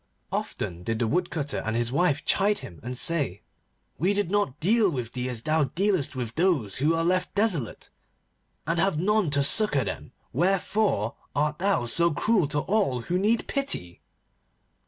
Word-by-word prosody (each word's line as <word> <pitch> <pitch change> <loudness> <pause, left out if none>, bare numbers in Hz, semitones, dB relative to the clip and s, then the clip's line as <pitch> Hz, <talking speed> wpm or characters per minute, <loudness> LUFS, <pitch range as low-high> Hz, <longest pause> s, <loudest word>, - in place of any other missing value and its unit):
Often 85 0 -4
did 115 +5 -2
the 115 - 0
Woodcutter 155 +1 -1
and 110 - -2
his 120 0 0
wife 150 0 +1
chide 205 +1 +2
him, 110 -11 -10
and 125 +1 -5
say: 140 - -1 0.6
'We 190 +5 +2
did 205 -3 -1
not 200 -9 0
deal 210 +4 +3
with 125 -7 -4
thee 125 0 -3
as 120 -2 -4
thou 155 -1 +2
dealest 175 0 0
with 120 -3 -4
those 155 - +1
who 150 +5 +2
are 165 - 0
left 180 +1 0
desolate, 195 - 0 0.7
and 165 +3 0
have 190 -3 +2
none 205 +1 +2
to 140 -1 +2
succour 145 - +4
them. 95 -3 -6 0.2
Wherefore 180 - +1 0.2
art 150 +2 0
thou 195 -9 +1
so 170 +8 +2
cruel 185 +2 +1
to 145 0 0
all 185 - 0
who 175 +10 -1
need 220 +4 +1
pity? 180 - -3
155 Hz, 170 wpm, -26 LUFS, 125-195 Hz, 0.7 s, succour